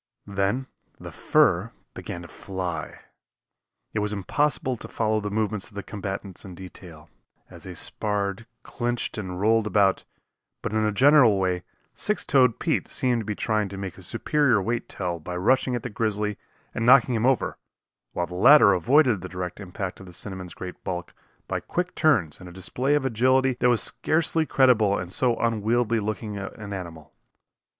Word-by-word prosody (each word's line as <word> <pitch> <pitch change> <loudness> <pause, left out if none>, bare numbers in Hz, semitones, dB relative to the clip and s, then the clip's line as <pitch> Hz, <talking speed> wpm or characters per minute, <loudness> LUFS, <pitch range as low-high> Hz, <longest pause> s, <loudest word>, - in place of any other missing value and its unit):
Then 100 +6 -1 0.3
the - - -9
fur - - +2 0.2
began 85 - -7
to - - -10
fly. 90 -2 -5 0.9
It 110 - 0
was 105 0 -1
impossible 130 +6 0
to - - -9
follow 110 -1 0
the 105 -1 -4
movements 105 -2 -1
of 105 - -17
the 100 - -5
combatants 95 -2 -6
in 95 -3 -10
detail, 90 -3 -11 0.4
as - - -11
they - - -8
sparred, 105 +1 -2 0.2
clinched 120 -2 -3
and 90 -3 -5
rolled 110 +1 +3
about, 100 -2 +2 0.6
but - - -3
in 110 0 +1
a 105 - +2
general 125 -2 +6
way 90 -2 0 0.3
Six 210 - 0
Toed 130 -5 +4
Pete - - -1
seemed 125 -3 0
to - - -8
be 105 0 -3
trying 105 -1 0
to 100 - -8
make 95 -2 -5
his - - -8
superior 145 -8 +2
weight 115 +5 -2
tell 90 -3 -3
by 90 +3 -6
rushing 125 +6 +2
at 120 - -4
the 125 - -4
grizzly 105 -1 -2 0.3
and 115 - -2
knocking 125 +1 +6
him 115 +2 +1
over, 135 -3 0 0.5
while 85 - -1
the 90 - -11
latter 105 +2 +7
avoided 120 - +3
the 95 - -7
direct 90 0 -5
impact 95 -1 -6
of 95 - -11
the 90 - -11
cinnamon's 95 -1 -6
great 90 -1 -8
bulk 90 -2 -5 0.3
by - - -2
quick 180 +1 -3
turns 120 - +2
and 90 - -10
a - - -11
display 125 +10 -1
of 145 -2 0
agility 130 +2 +2
that 125 - +4
was 120 -2 +3
scarcely 160 0 +1
credible 115 -7 +4
in 90 -1 -5
so 120 +3 +1
unwieldy 115 +1 +1
looking 105 0 -4
an 100 +1 -7
animal. 85 -5 -8
105 Hz, 175 wpm, -25 LUFS, 95-120 Hz, 0.9 s, latter